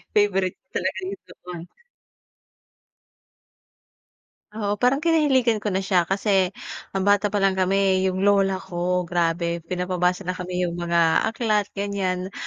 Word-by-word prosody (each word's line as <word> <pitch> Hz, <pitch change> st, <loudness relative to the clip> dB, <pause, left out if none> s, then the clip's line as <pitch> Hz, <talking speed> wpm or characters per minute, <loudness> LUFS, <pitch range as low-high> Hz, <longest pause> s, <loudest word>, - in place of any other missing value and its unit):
favorite 195 Hz, -3 st, +2 dB
ko -, -, -61 dB
talaga -, -, -2 dB
yung 395 Hz, -, -9 dB
doon. 180 Hz, -1 st, -10 dB, 2.9 s
Oo. 205 Hz, 0 st, -3 dB
Parang 250 Hz, +2 st, +4 dB
kinahiligan 280 Hz, -8 st, +2 dB
ko 210 Hz, -, -1 dB
na 190 Hz, -, 0 dB
siya. 185 Hz, -3 st, +1 dB
Kasi 195 Hz, -1 st, +2 dB, 0.4 s
nang 195 Hz, 0 st, -1 dB
bata 205 Hz, 0 st, +3 dB
pa 205 Hz, -, -1 dB
lang 195 Hz, -1 st, +2 dB
kami 190 Hz, 0 st, +2 dB
yung 185 Hz, +1 st, -1 dB
lola 195 Hz, -1 st, +3 dB
ko, 180 Hz, 0 st, -2 dB
grabe 170 Hz, 0 st, -1 dB
pinapabasa 180 Hz, +1 st, -1 dB
na 180 Hz, -, -1 dB
kami 180 Hz, 0 st, -3 dB
yung 170 Hz, -, -3 dB
mga 170 Hz, -1 st, +2 dB
aklat, 215 Hz, -3 st, 0 dB
ganyan. 190 Hz, -2 st, -2 dB
190 Hz, 135 wpm, -23 LUFS, 180-205 Hz, 2.9 s, Parang